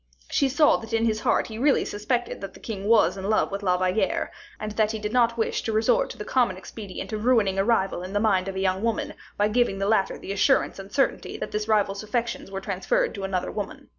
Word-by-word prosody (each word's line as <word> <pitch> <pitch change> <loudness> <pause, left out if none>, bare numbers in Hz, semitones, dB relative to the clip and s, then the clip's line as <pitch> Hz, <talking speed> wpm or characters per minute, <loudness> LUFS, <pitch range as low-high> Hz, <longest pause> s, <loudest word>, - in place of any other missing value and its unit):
She 275 - +2
saw 295 +3 +4
that 225 0 -9
in 225 0 +2
his 215 -1 +1
heart - - +2
he 220 -1 -7
really 280 +2 +3
suspected 240 +4 -2
that 195 -1 -7
the - - -13
king 200 -3 -5
was 210 -4 +4
in 195 +1 -4
love 215 - +2
with 200 +1 -3
La 180 -2 +2
Valliere, 185 +3 0 0.3
and 215 0 -4
that 215 +1 +1
he - - -2
did 210 +1 -4
not 235 -2 +3
wish 225 - 0
to 225 - -2
resort 220 +2 +2
to - - -8
the 210 - -6
common 240 -8 +1
expedient 200 +2 -8
of 215 0 -3
ruining 220 -6 +3
a - - +4
rival 195 -5 +1
in 185 +1 -6
the 205 - +2
mind 195 -3 +2
of 190 0 -4
a 190 0 +1
woman, 230 +1 -1 0.2
by 205 - +3
giving 230 -2 +1
the 195 - -1
latter 205 -3 +2
the - - -7
assurance 200 - +2
and 195 +1 -9
certainty 270 +3 0
that - - -5
this 210 0 -2
rival's 205 -2 +1
affections 235 0 -3
were 195 0 -5
transferred - - 0
to 200 - -6
another 190 -2 -2
woman. 280 +7 -6
210 Hz, 245 wpm, -25 LUFS, 195-230 Hz, 0.3 s, saw